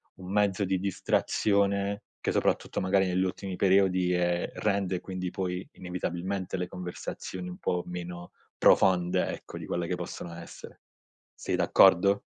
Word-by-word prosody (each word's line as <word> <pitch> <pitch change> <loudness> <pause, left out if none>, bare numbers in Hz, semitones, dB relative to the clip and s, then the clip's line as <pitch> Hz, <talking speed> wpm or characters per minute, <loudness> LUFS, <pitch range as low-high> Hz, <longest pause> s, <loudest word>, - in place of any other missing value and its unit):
un 95 0 -9
mezzo 100 -1 +2
di 95 -1 +1
distrazione, 100 +1 +1 0.2
che - - 0
soprattutto - - 0
magari 95 +1 +2
negli 90 +1 +1
ultimi 95 0 -3
periodi, 95 -2 +3
ehm, 90 0 +1
rende 100 -3 0
quindi 90 -1 -4
poi 90 -1 -3
inevitabilmente 90 +1 -3
le 90 0 -2
conversazioni 90 0 -6
un 90 - -8
po' 90 -1 -1
meno 90 0 -6 0.3
profonde 90 -2 +4
ecco, - - -7
di - - -7
quelle 85 -1 -2
che 90 - -1
possono 85 -1 -6
essere. 85 0 -11 0.5
Sei - - -2
d'accordo? 100 +2 +5
90 Hz, 140 wpm, -28 LUFS, 90-95 Hz, 0.5 s, d'accordo